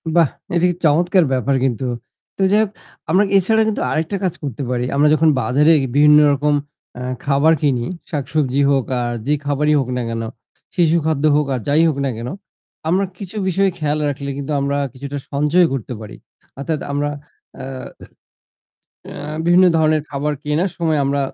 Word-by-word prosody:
বাহ! 165 -5 +5 0.3
এটা 170 +1 +3
কি 175 - -1
চমৎকার 175 +4 +3
ব্যাপার 130 +2 +1
কিন্তু। 130 -1 -1 0.5
তো - - -4
যাই 210 - +4
হোক 215 - -3 0.4
আমরা 185 +5 +4
এছাড়া 220 +4 +3
কিন্তু 215 - -1
আরেকটা 160 +5 -1
কাজ 185 -3 0
করতে 140 -1 -4
পারি। 125 -1 -1
আমরা 145 +2 +4
যখন 160 +1 +4
বাজারে 145 +8 +3 0.2
বিভিন্ন 150 +1 +7
রকম, 145 +1 +1 0.5
আ - - -6 0.2
খাবার 140 +3 +3
কিনি, 130 -5 +1 0.3
শাকসবজি 140 -2 -1
হোক 135 -3 +2
আর 120 0 -2
যে 145 - +3
খাবারই 145 +1 +1
হোক 130 -2 -2
না - - -1
কেন, 115 0 -3 0.5
শিশু 170 -2 +3
খাদ্য 155 -3 0
হোক 150 0 +2
আর 125 - -1
যাই 145 +3 +3
হোক 150 - -3
না - - 0
কেন 120 +2 -5 0.6
আমরা 185 +4 +2
কিছু 195 +1 -9
বিষয় 195 +1 +2
খেয়াল 150 0 -1
রাখলে 140 0 -5
কিন্তু 140 +1 -5
আমরা 140 +1 0 0.2
কিছুটা 140 +2 -6
সঞ্চয় 150 +5 +3
করতে 125 -2 -4
পারি। 105 - -9 0.4
অর্থাৎ 155 +2 -2
আমরা 145 +1 -1 0.5
আ - - -7 1.5
অ্যা 150 +1 -6
বিভিন্ন 175 +2 +5
ধরনের 155 -1 +2
খাবার 145 +1 -2
কেনার 155 +6 0
সময় 160 -3 0
আমরা 140 +1 0
150 Hz, 170 wpm, -19 LUFS, 140-165 Hz, 1.5 s, বিভিন্ন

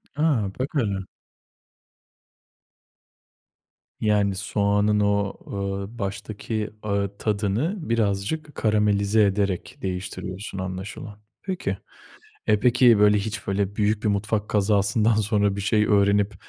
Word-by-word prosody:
A, 140 -10 +1
bak 130 - -1
hele! 100 -8 -1 2.9
Yani 105 -2 +2
soğanın 105 +1 +1
o, 100 -1 +1 0.2
ııı, 100 +2 -4
baştaki, 105 +2 -4 0.2
ııı, 100 -1 -1
tadını 110 - -1
birazcık 115 +7 -1
karamelize 105 -1 +2
ederek 100 -2 -1
değiştiriyorsun 95 +1 -5
anlaşılan. 95 +2 -6 0.2
Peki. 185 -1 -3 0.7
E, 105 -1 +3
peki 120 -2 +5
böyle 105 0 +5
hiç 105 0 -4
böyle 100 0 -1
büyük 105 0 +1
bir 105 - +3
mutfak 105 +1 -1
kazasından 105 +2 +2
sonra 105 -2 +1
bir 100 - -3
şey 105 +2 +2
öğrenip 100 0 +3
105 Hz, 105 wpm, -24 LUFS, 100-110 Hz, 2.9 s, peki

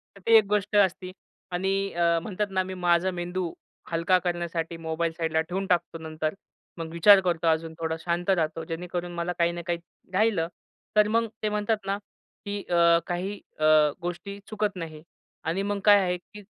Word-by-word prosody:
तर - - -14
ती 230 0 +6
एक 215 - +4
गोष्ट 210 0 0
असते. 185 -2 +2 0.4
आणि 185 +2 0 0.5
म्हणतात 210 +2 -2
ना 190 -1 +1
मी 190 - -6
माझा 175 0 +2
मेंदू 175 0 -3 0.4
हलका 170 +2 +3
करण्यासाठी 170 -1 -3
मोबाईल 165 0 -2
साईडला 160 -1 +1
ठेवून 180 +4 -3
टाकतो 175 -2 +1
नंतर. 155 -1 -3 0.4
मग 165 -1 -5
विचार 195 +4 +7
करतो 170 -2 0
अजून. 160 0 +1
थोडा 160 0 -1
शांत 175 +2 -2
राहतो 165 -3 +1
जेणेकरून 175 +1 -4
मला 170 +1 -1
काही 170 0 +3
ना 175 0 -5
काही 175 - 0 0.4
राहिलं 195 -5 +2 0.5
तर 210 0 +6
मग 230 +2 +2 0.2
ते 215 - +2
म्हणतात 210 +1 0
ना, 195 +1 0 0.5
की 205 0 -3
अ, 170 -1 +5
काही 190 +3 -3 0.2
अ, 155 - -2 0.4
गोष्टी 175 +3 -5
चुकत 210 -2 -1
नाही 160 -3 -7 0.4
आणि 170 +4 0
मग 205 0 -1
काय 205 -1 +8
आहे, 180 -2 0
की 210 +4 -14
175 Hz, 175 wpm, -27 LUFS, 170-200 Hz, 0.5 s, काय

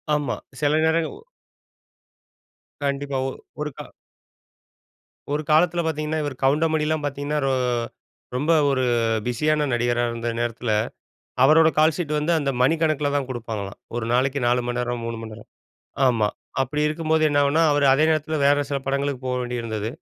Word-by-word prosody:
ஆமா 145 -4 -1 0.3
சில 145 0 +2
நேரங்க 160 0 +1 1.7
கண்டிப்பா 140 -1 -1
ஒ - - -3 0.3
ஒருக்கா 150 -2 -5 1.5
ஒரு 150 - 0
காலத்தில 170 +2 +4
பாத்தீங்கன்னா 155 0 -2
இவர் 145 -3 -5
கவுண்டமணிலாம் 155 +2 +1
பாத்தீங்கன்னா 145 +1 -2
ரொ - - +2 0.8
ரொம்ப 150 +6 +1 0.2
ஒரு 130 -2 +1 0.4
பிஸியான 150 +5 +1
நடிகரா 120 0 +1
இருந்த 115 0 -4
நேரத்தில, 120 0 -2 0.7
அவரோட 160 +3 +6
கால்ஷீட் 155 +1 +2
வந்து 150 +3 0
அந்த 140 -3 -1
மணிக்கணக்கில 155 +1 +2
தான் 140 -2 0
குடுப்பாங்களாம். 110 -5 -5 0.2
1 120 - -2
நாளைக்கு 130 +3 +1
4 125 +1 +2
மணிநேரம், 120 0 -2
3 115 -1 -4
மணிநேரம் 110 -1 -10 0.6
ஆமா. 115 -4 +2 0.4
அப்டி 150 +3 -2
இருக்கும்போது 160 +1 0
என்னாகும்னா 145 +2 +3
அவர் 145 -1 +2
அதே 150 +4 +4
நேரத்தில 155 0 0
வேற 145 +1 +5
சில 140 - 0
படங்களுக்கு 140 -1 -1
போக 125 - -1
வேண்டியிருந்தது. 115 -3 -3
140 Hz, 130 wpm, -23 LUFS, 125-155 Hz, 1.7 s, அவரோட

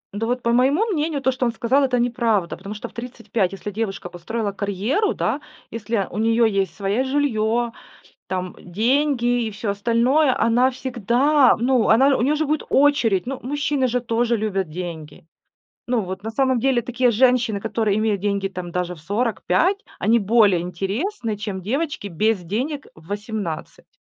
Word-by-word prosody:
Ну 225 +2 -2
вот, 245 +1 -1
по 235 - +1
моему 275 - +3
мнению, 315 -8 -1
то, 265 - +3
что 255 0 -2
он 235 - +1
сказал, 245 +5 +1
это 255 -2 +1
неправда, 235 -6 0
потому 200 +3 -8
что 215 - -6
в - - -19
35, 235 -5 -2
если 195 +1 -6
девушка 200 -3 -4
построила 205 +5 -3
карьеру, 205 - -1
да, - - -1 0.3
если 220 -3 -2
у 205 - -4
неё 230 +1 +3
есть 195 -5 0
своя 200 +5 0
жильё, 240 -4 0 0.6
там, 185 -1 -3
деньги 245 - +1
и 220 - -3
всё 210 +1 -4
остальное, 235 +7 +2
она 240 +3 +3
всегда, 255 +2 +2
ну 245 -1 +2
она, 265 +5 +5
у - - -1
нее 285 +5 +2
же 310 +1 0
будет 305 +1 -1
очередь. 265 -9 +3
Ну, 265 +1 -4
мужчины 285 0 0
же 250 +1 -1
тоже 235 0 0
любят 195 -5 -2
деньги. 160 -2 -7 0.6
Ну 245 -1 +1
вот, 190 -1 -6
на 220 - -4
самом 260 +1 +1
деле, 265 -1 +2
такие 245 +1 +1
женщины, 240 -2 +2
которые 215 -1 0
имеют 215 -3 0
деньги 200 -1 0
там 180 -2 -7
даже 180 0 -2
в 160 - -15
45, 220 - +1 0.2
они 230 +2 +3
более 205 -3 +4
интересны, 210 - -3
чем 205 -2 -5
девочки 270 - -2
без 205 +3 0
денег 255 - -3
в 160 +1 -18
18. 205 -5 -5
230 Hz, 170 wpm, -22 LUFS, 200-255 Hz, 0.6 s, она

